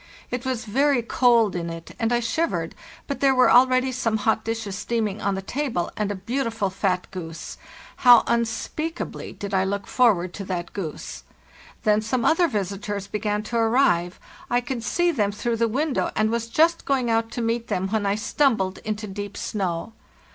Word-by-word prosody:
It 250 +1 -3
was 250 -3 -2
very 265 +3 +2
cold 235 -4 +3
in 170 -1 -3
it, 165 0 -8
and 225 0 +1
I 240 0 +2
shivered, 330 +8 -1 0.3
but 280 - -4
there 270 -1 +4
were 255 - +5
already 255 +1 +5
some 235 -3 0
hot 220 +1 +1
dishes 225 -3 -3
steaming 215 -1 -2
on 200 -1 0
the 190 - -4
table, 240 -7 -2
and 210 -1 -1
a - - -3
beautiful 225 0 -2
fat 185 -1 0
goose. 165 -3 -7 0.4
How 245 -2 +7
unspeakably 235 +8 -2
did 200 0 -7
I 190 -1 +3
look 200 +1 -2
for 245 -4 +4
ward 175 0 -5
to 200 - -6
that 175 -2 -4
goose! 175 -7 -6 0.6
Then 210 -2 +3
some 235 +2 -1
other 335 +2 +4
visitors 200 - -3
began 210 0 -2
to 235 +2 -3
arrive; 225 -7 +2 0.3
I 245 - +3
could 245 -1 -4
see 350 +7 +2
them 210 -9 0
through 230 +3 -2
the 230 +1 +2
window, 280 +5 0
and 215 0 +2
was 230 0 -1
just 325 +8 +2
going 255 -4 +1
out 225 0 +1
to 240 - -3
meet 230 +1 -1
them 190 +1 -1
when 210 -1 0
I 200 - +2
stumbled 215 -4 +1
into 215 0 -4
deep 205 0 -6
snow. 190 +1 -3
225 Hz, 185 wpm, -24 LUFS, 200-245 Hz, 0.6 s, How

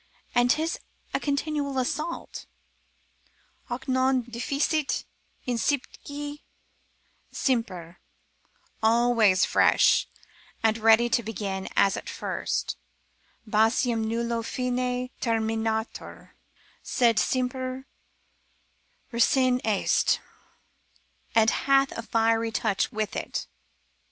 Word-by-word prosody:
And 245 0 +3
'tis 320 +5 +1 0.3
a - - +1
continual 285 -1 -1
assault,—hoc 270 -3 -7
non 260 0 +2
deficit 275 +6 -1 0.4
incipitque 285 +4 -2 0.9
semper, 185 - -2 0.8
always 225 -4 +4
fresh, - - +4 0.6
and 220 0 +2
ready 225 +2 +5
to 235 - +2
begin 200 -3 -4
as 195 - +4
at - - -7
first, - - -3 0.7
basium 225 +2 +2
nullo 230 +1 -1
fine 250 +1 -2
terminatur, 225 -1 -2 0.5
sed 235 -5 +2
semper 255 +4 -1 1.3
recens 250 +1 +3
est, 210 -3 +2 1.2
and 225 -1 +5
hath 275 0 +3
a - - -5
fiery 225 0 +1
touch 215 -2 0
with 215 -1 -3
it. - - -3
235 Hz, 80 wpm, -26 LUFS, 225-260 Hz, 1.3 s, ready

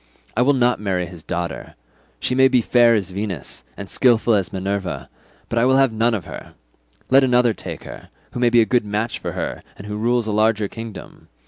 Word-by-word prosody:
I 120 - +2
will 140 +3 +4
not 125 -1 +2
marry 95 -3 -1
his 85 -2 -11
daughter; 85 0 -5 0.4
she - - -1
may 130 +1 +5
be 130 -1 +3
fair 120 0 +4
as 95 -4 -2
Venus, 95 - -5
and 100 - -7
skilful 120 -1 +3
as 95 -5 0
Minerva, 95 -6 -4 0.4
but 115 - -1
I 115 - +3
will 130 +1 +4
have 135 -4 +3
none 115 +1 +2
of 95 - -5
her: - - -10 0.6
let 135 +1 +6
another 125 -2 +3
take - - -8
her, - - -11 0.2
who - - -5
may 120 -1 +4
be 120 0 +5
a - - +3
good 125 0 +1
match 105 +3 -3
for - - -5
her - - -4 0.2
and 100 - -10
who 105 0 -5
rules 120 +1 +1
a 110 - -2
larger 110 0 +2
kingdom. 115 0 -10
110 Hz, 215 wpm, -21 LUFS, 100-120 Hz, 0.6 s, let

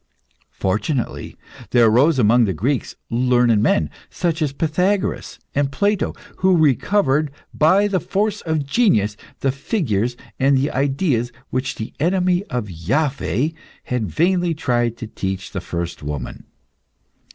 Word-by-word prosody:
Fortunately, 110 +8 -2 0.3
there 120 -2 +5
arose 130 +8 +4
among 120 0 +5
the 95 -4 -1
Greeks 130 - -1 0.2
learned 120 -2 +3
men, 80 -8 +2 0.2
such 170 -2 -1
as 150 -3 +1
Pythagoras, 180 +7 -1 0.2
and 140 -1 0
Plato, 200 +5 0 0.2
who 185 -1 +3
recovered 150 - +2 0.2
by 190 +7 +4
the 195 -2 0
force 210 +4 -1
of 160 -3 -1
genius, 135 - +2 0.3
the 135 - +2
figures 125 - -1 0.2
and 135 +1 +4
the 135 +2 0
ideas 135 -3 0 0.2
which 130 +1 -2
the 110 - -6
enemy 180 +3 +2
of 120 - -3
Iaveh 135 - -1 0.3
had 125 -4 -2
vainly 175 - +1
tried 120 -5 0
to 115 - -6
teach 95 -3 -4
the 95 - -4
first 85 -1 -4
woman. 75 -3 -6
135 Hz, 130 wpm, -20 LUFS, 115-165 Hz, 0.3 s, there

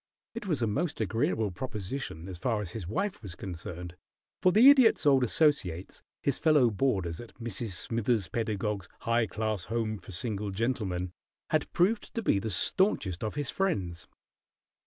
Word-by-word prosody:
It 230 -3 -6
was 150 -9 0
a - - +4
most 145 +10 -1
agreeable 110 - 0
proposition 105 - -5
as 90 -3 -7
far 115 0 0
as 100 -4 -5
his 95 -5 -6
wife 195 - -2
was 95 -5 -8
concerned, 90 -1 -7 0.5
for 185 - +5
the 220 +7 +7
Idiot's 260 - +6
old 135 -3 +5
associates, 110 - +1 0.2
his 140 - +1
fellow 145 -7 +4
boarders 95 -7 0
at 120 - -13
Mrs. 115 -3 -4
Smithers 115 0 0
Pedagog's 105 -2 -2
"High 115 -1 +2
Class 110 -4 -2
Home 110 -2 -2
for 95 - -12
Single 105 +2 -2
Gentlemen," 95 -4 -1 0.4
had - - +1
proved 205 +5 +1
to 230 - -1
be 100 - +3
the 110 - -3
stanchest 100 - +1
of 110 - -3
his 145 -2 -2
friends. 95 - -1
110 Hz, 160 wpm, -29 LUFS, 95-135 Hz, 0.5 s, the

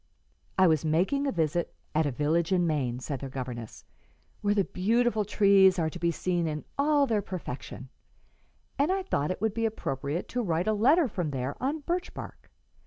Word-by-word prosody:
"I 190 - +6
was 160 -4 +3
making 185 - +1
a - - +1
visit 165 0 -1 0.2
at 155 0 +2
a - - -1
village 155 +6 0
in 180 -2 +3
Maine," 135 -7 -1
said 135 +1 -4
their 135 - -6
governess, 125 -4 -7 0.6
"where 205 0 +1
the 200 - +3
beautiful 220 +4 +1
trees 195 -2 +5
are 160 -2 0
to 175 - -8
be 170 0 +1
seen 175 0 -1
in 150 -1 -4
all 290 0 +3
their 220 -5 +1
perfection, 140 -8 -7 0.9
and 290 +6 +3
I 385 0 0
thought 150 - -1
it 185 - -3
would 220 -2 +1
be 230 0 +1
appropriate 145 -6 -3
to 245 - -1
write 175 -3 0
a 215 - +3
letter 275 +10 +4
from 180 -8 -3
there 135 0 -3
on 290 +4 -1
birch 350 +5 -3
bark. - - -9
180 Hz, 190 wpm, -28 LUFS, 150-225 Hz, 0.9 s, I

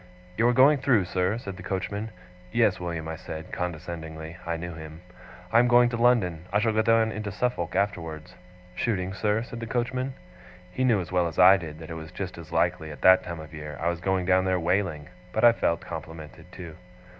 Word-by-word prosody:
'You 115 +4 +3
are - - +5
going 135 +3 +6
through, 125 -8 +3
sir?' 90 +4 0
said 100 -5 -7
the - - -9
coachman. 100 +3 -3 0.4
'Yes, 115 -4 +2
William,' 85 -2 -4
I 80 - -4
said, 80 0 -8
condescendingly 80 -2 -5
(I 85 -1 -1
knew 85 +1 -6
him); 80 0 -10 0.5
'I 115 - +6
am 120 - +4
going 120 0 +5
to 120 - -3
London. 110 -9 +2
I 105 - +3
shall 110 +1 +1
go 110 - +3
down 115 0 +3
into 105 -2 -4
Suffolk 105 -4 -2
afterwards.' 80 -6 -2 0.4
'Shooting, 95 -5 -1
sir?' 105 +2 0
said 120 0 -8
the 115 - -5
coachman. 125 +2 -2 0.6
He 130 - -2
knew 115 -6 +3
as 85 - -8
well 90 -1 +2
as 80 - -7
I 95 +2 +8
did 80 -4 -8
that 80 0 -10
it 80 -1 -5
was 80 - -9
just - - -6
as - - -11
likely, 80 - 0
at 75 - -10
that 95 0 +6
time 85 -2 -6
of 80 +1 -10
year, 75 -1 -7
I 85 - 0
was 85 0 -4
going 95 0 0
down 95 +1 +3
there 95 -1 +1
whaling; 85 -3 -1 0.3
but 110 - -1
I 120 - +9
felt 85 -7 0
complimented, 80 -2 -9
too. 85 -3 -9
90 Hz, 215 wpm, -26 LUFS, 80-110 Hz, 0.6 s, I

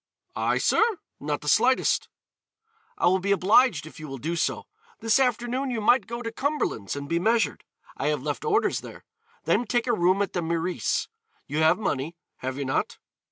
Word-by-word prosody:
"I, - - +1
sir? - - +3 0.4
not 145 0 -3
the 150 - -9
slightest." 245 - +3 0.9
"I - - +1
will 185 +2 +4
be 200 +2 -1
obliged 200 - +4
if 155 - -12
you 155 - -7
will 135 -1 -6
do 160 +7 -3
so. 165 - -1 0.4
This 225 +3 +3
afternoon 250 +1 0
you 240 -3 -2
might 215 0 +3
go 235 +1 -5
to 230 - -4
Cumberland's 260 - -2
and 140 0 -5
be 170 +3 0
measured. 225 +5 +1 0.3
I - - -2
have - - 0
left - - -3
orders 425 -2 +1
there. - - -11 0.4
Then 240 - +1
take 240 +2 +1
a 240 - +1
room 185 0 +3
at 200 - -5
the 175 - -1
Meurice; 170 +2 -1 0.4
you 155 - -3
have 160 +2 +4
money, 165 -6 -2 0.2
have 130 +1 -4
you 140 - -3
not? 130 - -1
190 Hz, 190 wpm, -26 LUFS, 155-240 Hz, 0.9 s, will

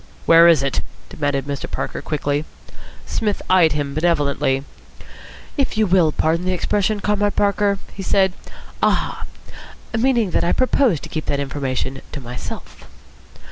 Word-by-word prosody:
"Where 165 +1 +7
is 165 -5 +5
it?" 140 - 0 0.3
demanded 145 -2 -1
Mr. 140 -1 -4
Parker - - -4
quickly. 145 -1 -1 0.6
Psmith 210 -2 -1
eyed 175 -4 +5
him 145 -2 -2
benevolently. 145 -4 +1 0.9
"If 275 -5 0
you 220 - +4
will 180 -4 +3
pardon 160 +3 0
the 185 0 0
expression, 205 +3 0
Comrade 205 0 +1
Parker," 200 0 +2 0.2
he 195 - -7
said, 190 -1 +2 0.5
"'Aha!' - - 0 0.7
Meaning 230 -4 +2
that - - +1
I 170 - +2
propose 255 - +2
to - - -9
keep 155 - -4
that 140 - 0
information 135 -1 -3
to 150 - -4
myself." 125 -2 -8
170 Hz, 140 wpm, -20 LUFS, 145-200 Hz, 0.9 s, Where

